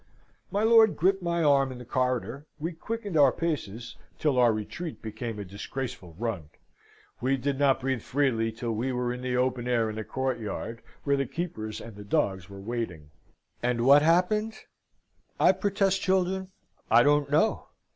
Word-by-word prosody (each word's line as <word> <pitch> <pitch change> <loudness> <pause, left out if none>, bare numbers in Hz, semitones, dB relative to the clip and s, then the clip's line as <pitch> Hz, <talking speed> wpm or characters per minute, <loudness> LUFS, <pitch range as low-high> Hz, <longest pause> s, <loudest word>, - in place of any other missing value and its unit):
My 205 +2 0
lord 225 -2 +6
gripped 190 +3 +2
my 170 -1 0
arm 140 -2 +4
in 130 - -7
the 125 - -10
corridor, 125 +2 -1
we 165 +4 -2
quickened 210 +2 -5
our 140 -4 +6
paces 120 - -4 0.2
till 145 -5 +1
our 120 -2 +6
retreat 130 +10 -5
became 110 +1 -5
a 100 - -5
disgraceful 100 -2 -6
run. 100 -9 -3 0.7
We 135 +2 +1
did 135 +1 -2
not 140 -2 +3
breathe 130 -2 -1
freely 120 -5 0
till 115 +1 -4
we 120 +4 -1
were 125 -1 -1
in 125 - -7
the 125 -1 -1
open 125 -1 0
air 115 -3 +1
in 110 - -8
the 110 - -3
courtyard, 115 -3 -3 0.2
where 140 -1 +2
the 135 -2 -1
keepers 130 -8 -4
and 115 -2 -10
the 105 - -9
dogs 95 -2 -1
were 100 0 -10
waiting. 95 -9 -5 0.5
And 120 -1 0
what 140 +2 +8
happened? 185 +7 +2 0.8
I - - +6
protest, 195 -2 0
children, 190 0 0 0.4
I 115 +2 +6
don't 145 0 +3
know. 155 +10 +2
130 Hz, 170 wpm, -28 LUFS, 115-160 Hz, 0.8 s, what